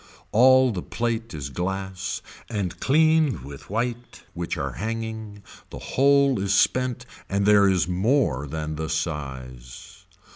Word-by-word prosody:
All 130 +2 +6
the 95 -5 -4
plate 115 +1 -3
is 70 -2 -6
glass 95 +2 -4 0.3
and 100 -6 -3
cleaned 155 - +3
with 70 +1 -11
white 120 +3 -4
which 85 0 -4
are 70 -1 -2
hanging, 110 - -5 0.3
the - - -8
whole 140 -2 +3
is 100 +1 +1
spent 125 +3 +1 0.2
and 100 +1 0
there 100 -1 +6
is 90 -3 +1
more 90 - +1
than 75 +1 -4
the 80 0 -3
size. 65 -6 -6
100 Hz, 135 wpm, -24 LUFS, 80-120 Hz, 0.3 s, All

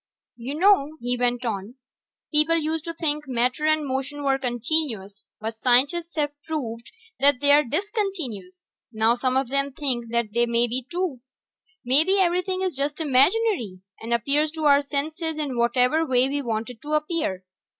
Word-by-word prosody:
"You 250 +4 -5
know," 315 -4 +3
he 245 +1 -1
went 245 0 0
on, 210 +1 -4 0.6
"people 305 +2 +3
used 315 0 -2
to 335 - -4
think 300 -3 -2
matter 250 +4 0
and 310 -1 +2
motion 270 +2 -3
were 270 -1 +1
continuous, 240 -5 -2
but 220 +1 -4
scientists 280 +8 +1
have 295 -2 0
proved 235 -8 -5 0.3
that 280 -2 +4
they 285 +1 +3
are 295 +1 +6
discontinuous. 305 - -4 0.2
Now 220 0 +3
some 255 +1 0
of 265 -2 0
them 275 +1 0
think 245 -5 -2
time 235 -2 0
may 235 0 +2
be, 245 +2 -3
too. 345 -7 -3 0.6
Maybe 310 +10 +4
everything 370 0 +1
is 370 -5 -2
just 285 +3 -2
imaginary, 285 - +2 0.2
and 230 - -7
appears 280 +6 +1
to 315 -1 -5
our 285 -1 +6
senses 310 +3 -3
in 290 -4 -3
whatever 250 +6 +2
way 260 -3 +3
we 285 +1 -2
want 230 -1 -3
it 225 - -15
to 300 +1 -5
appear. 305 - -1
275 Hz, 165 wpm, -24 LUFS, 240-310 Hz, 0.6 s, are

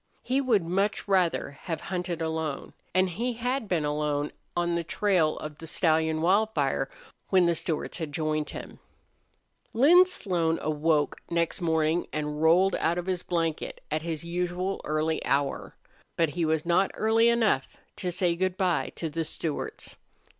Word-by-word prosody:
He 265 +2 +1
would 230 -8 +2
much 195 +6 -1
rather 185 -7 +2
have 165 -3 -3
hunted 175 -2 -2
alone, 160 -3 -3 0.2
and 185 +1 +3
he 235 +8 -2
had 245 +1 -2
been 170 -5 0
alone 150 0 -1 0.3
on 175 0 +1
the 170 0 0
trail 180 -3 +1
of 150 -1 -7
the 165 - -9
stallion 160 -1 +1
Wildfire 175 -9 +2 0.4
when 185 -2 +5
the 170 - +3
Stewarts 165 +1 -3
had 160 -3 -4
joined 155 0 -1
him. - - -9 0.9
Lin 340 +10 +7
Slone 170 - 0
awoke 150 -1 +1
next 170 +2 0
morning 160 0 +1
and 150 0 -3
rolled 180 +4 +5
out 165 +2 +1
of 175 - -3
his 185 -2 -1
blanket 165 -3 -2
at 155 +1 0
his 160 -1 -4
usual 180 +2 -2
early 155 +1 0
hour. 140 0 -1 0.4
But 165 -2 +3
he 165 +3 -1
was 160 0 0
not 175 +3 +3
early 225 +2 +4
enough 225 - +2 0.3
to 180 - -2
say 175 -1 +1
good 185 +1 -1
by 180 -5 +1
to 165 - -3
the 165 +1 -2
Stewarts. 155 0 -4
170 Hz, 160 wpm, -27 LUFS, 155-185 Hz, 0.9 s, Lin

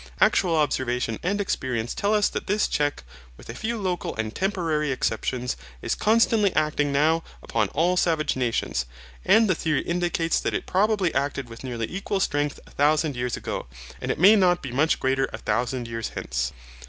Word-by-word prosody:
Actual 170 -3 +3
observation 125 -6 0
and 200 +4 -1
experience 125 - -2
tell 205 - 0
us 210 -1 +3
that - - -5
this 210 +2 +2
check, 145 - -1 0.3
with - - -14
a - - -4
few 225 - -3
local 185 -4 -2
and 110 0 -3
temporary 165 -6 0
exceptions, 125 0 -1 0.3
is - - 0
constantly 220 -2 +3
acting 150 -2 +1
now 160 +4 +2 0.2
upon 110 -2 0
all 170 - +1
savage 165 -4 +1
nations, 115 - -1 0.4
and 225 0 +5
the 185 - +3
theory 155 -3 0
indicates 170 -1 0
that - - -2
it - - -2
probably 200 -2 +1
acted 140 -3 -2
with 115 +2 -10
nearly 120 -3 -3
equal 195 +1 -3
strength 145 -5 0
a - - -18
thousand 150 0 +2
years 125 -1 -2
ago, - - -5 0.3
and - - -4
it - - 0
may 195 +7 +7
not 180 -3 +3
be 130 - -5
much 150 +6 +2
greater 135 +1 +1
a - - -4
thousand 120 +3 -1
years 115 -1 -4
hence. 65 +1 -2
150 Hz, 180 wpm, -25 LUFS, 125-180 Hz, 0.4 s, may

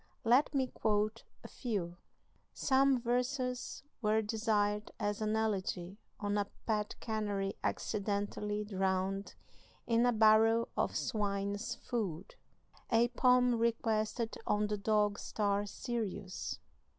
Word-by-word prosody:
Let 255 +5 +4
me 265 -1 +3
quote 215 -2 -1 0.2
a - - -7
few: 190 -8 -3 0.6
"Some 270 -1 +3
verses 250 +1 -1 0.2
were 215 0 +2
desired 210 -1 0
as 205 +1 -1
an 215 0 +1
elegy 195 -3 -1 0.2
on 205 -1 0
a 200 - 0 0.2
pet 210 -2 -1
canary 205 -3 -2
accidentally 205 0 -1
drowned 190 0 -1 0.5
in 235 +1 +3
a - - +4
barrel 225 +1 +5
of - - 0
swine's 205 -1 -1
food. 200 -7 -4 0.6
"A 235 +1 +4
poem 250 0 +4
requested 225 0 0
on 210 0 +2
the 210 0 -1
dog 210 0 +2
star 205 -1 0
Sirius. 205 -4 -4
215 Hz, 115 wpm, -34 LUFS, 205-230 Hz, 0.6 s, barrel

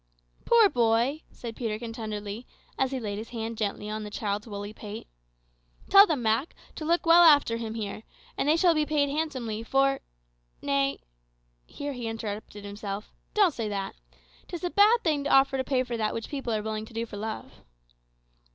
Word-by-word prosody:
"Poor 465 -3 +6
boy!" 240 - +2
said 230 -2 -8
Peterkin 225 -1 -4
tenderly, 215 0 -5 0.3
as 265 - +1
he 265 -1 -3
laid 205 -3 -4
his 220 - -8
hand 230 -1 -4
gently 210 -1 -3
on 215 0 -4
the 210 - -6
child's 205 +1 -3
woolly 205 0 -6
pate. 210 0 -8 0.9
"Tell 400 +1 +9
them, 290 -7 -1
Mak, 225 +8 +1 0.2
to 310 - -6
look 340 +2 +1
well 335 +1 +8
after 290 -8 +6
him 225 -1 -5
here, 210 -2 -4 0.3
and 285 - 0
they 310 - +5
shall 345 0 +5
be 305 -1 +2
paid 295 -2 +1
handsomely 265 -8 -2
for 270 +3 +2 0.6
nay" 140 - 0 0.7
(here 285 0 -5
he 245 -3 -5
interrupted 210 -2 -6
himself), 205 0 -6 0.2
"don't 400 -6 +4
say 225 -4 -3
that. 195 -1 -3 0.5
'Tis 345 0 -7
a 355 - -1
bad 435 +4 +5
thing 300 -4 +1
to - - 0
offer 270 0 +5
to 260 - 0
pay 260 -1 +1
for 245 -2 -4
that 215 -1 -1
which 225 - -5
people 270 -5 -3
are 215 -1 -1
willing 215 0 -3
to 225 - -15
do 230 +1 -1
for 210 -3 -9
love." 220 +1 -6
230 Hz, 190 wpm, -27 LUFS, 215-285 Hz, 0.9 s, Tell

